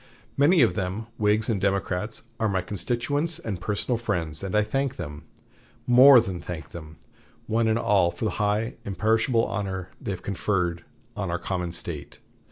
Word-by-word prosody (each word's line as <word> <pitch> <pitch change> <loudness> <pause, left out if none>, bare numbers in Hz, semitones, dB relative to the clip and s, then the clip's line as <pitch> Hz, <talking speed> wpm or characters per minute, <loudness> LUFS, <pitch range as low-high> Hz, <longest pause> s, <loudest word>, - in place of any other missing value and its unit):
Many 150 +2 +5
of 115 - +3
them, 100 +2 -3
Whigs 105 +1 +2
and 105 -5 0
Democrats, 100 +1 -1 0.2
are 110 -1 +1
my 95 -2 0
constituents 120 - -2
and 100 -5 -5
personal 110 +4 -1
friends; 85 -9 -2
and 95 +1 -3
I 105 - +4
thank 135 +5 -1
them 75 0 -7 0.6
more 125 +2 +8
than 95 -6 -3
thank 85 -2 -7
them 80 -2 -10 0.5
one 115 +1 +1
and 110 0 +2
all, 100 -6 +3
for 110 - -5
the 110 - +1
high, 105 +3 0
imperishable 110 +5 +1
honor 95 -2 -3
they - - -5
have 95 -2 -4
conferred 90 -3 -1 0.3
on 95 -3 -3
our 85 - 0
common 90 -1 -3
State." 85 -4 -5
105 Hz, 170 wpm, -26 LUFS, 90-115 Hz, 0.6 s, more